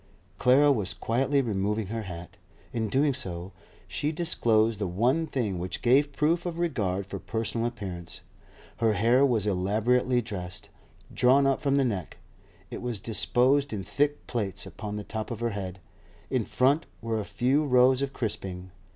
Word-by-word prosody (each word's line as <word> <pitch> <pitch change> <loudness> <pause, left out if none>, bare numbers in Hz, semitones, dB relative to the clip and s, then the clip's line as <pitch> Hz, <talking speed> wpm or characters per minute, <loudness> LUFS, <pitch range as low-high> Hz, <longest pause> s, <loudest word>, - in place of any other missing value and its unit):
Clara 140 +3 +5
was 105 -8 0
quietly 135 +4 +1
removing 105 -1 -1
her 115 +4 -4
hat. 90 -4 -8 0.4
In 115 -2 -1
doing 140 +5 +2
so, 90 -7 -4 0.4
she 150 - -2
disclosed 115 - +1
the 100 - -1
one 125 - +1
thing 105 - -2
which 90 +1 -5
gave 140 +4 +4
proof 165 +5 +1
of 170 -1 -4
regard 105 - -1
for 100 0 -6
personal 115 +2 -2
appearance. 95 -7 -7 0.6
Her 115 -2 +2
hair 115 +7 +4
was 120 -7 +2
elaborately 110 +6 +2
dressed. 100 -7 -6 0.4
Drawn 130 +3 +4
up 135 -1 +2
from 140 -2 +1
the 140 -1 +3
neck, 100 -8 -3 0.5
it - - -6
was 120 -4 -3
disposed 125 +6 +2
in 100 -3 -3
thick 145 +7 0
plaits 105 -6 -3
upon 105 -1 -6
the 105 - -4
top 110 +1 -5
of 115 - -5
her 120 0 -1
head; 95 -2 -5 0.5
in - - +1
front 140 +5 +2
were 115 -1 -2
a - - -2
few 125 +9 +1
rows 130 -1 +4
of 140 -1 -1
crisping. 95 -7 -4
115 Hz, 165 wpm, -27 LUFS, 100-135 Hz, 0.6 s, Clara